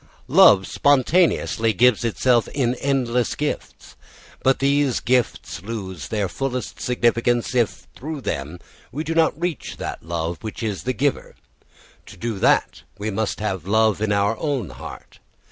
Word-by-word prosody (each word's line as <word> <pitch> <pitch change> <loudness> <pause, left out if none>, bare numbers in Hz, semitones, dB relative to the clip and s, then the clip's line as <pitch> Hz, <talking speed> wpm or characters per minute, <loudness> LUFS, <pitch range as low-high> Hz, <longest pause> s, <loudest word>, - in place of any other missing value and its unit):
Love 95 -2 +6
spontaneously 130 - +2
gives 120 +4 +3
itself 120 +1 +2
in 125 -4 +1
endless 125 -3 0
gifts. 150 0 -5 0.5
But 135 0 +3
these 140 -1 +2
gifts 125 -9 -1
lose 95 - -6
their 105 +2 -1
fullest 125 +5 -4
significance 120 0 +1
if 120 -4 0
through 150 +2 -6
them 75 - -4 0.3
we 150 +5 -3
do 165 - -2
not 160 -2 +2
reach 170 -6 -3
that - - -5
love, 85 0 -3
which 110 +1 -6
is 105 -2 -3
the 130 - 0
giver. 140 +1 -1 0.7
To - - -12
do 115 -4 -4
that, - - +2 0.2
we 105 +1 -3
must 105 +1 -2
have 95 -5 -3
love 110 0 +2
in 110 -1 0
our 100 +2 +2
own 140 - -2
heart. 65 - -11
120 Hz, 145 wpm, -22 LUFS, 100-135 Hz, 0.7 s, Love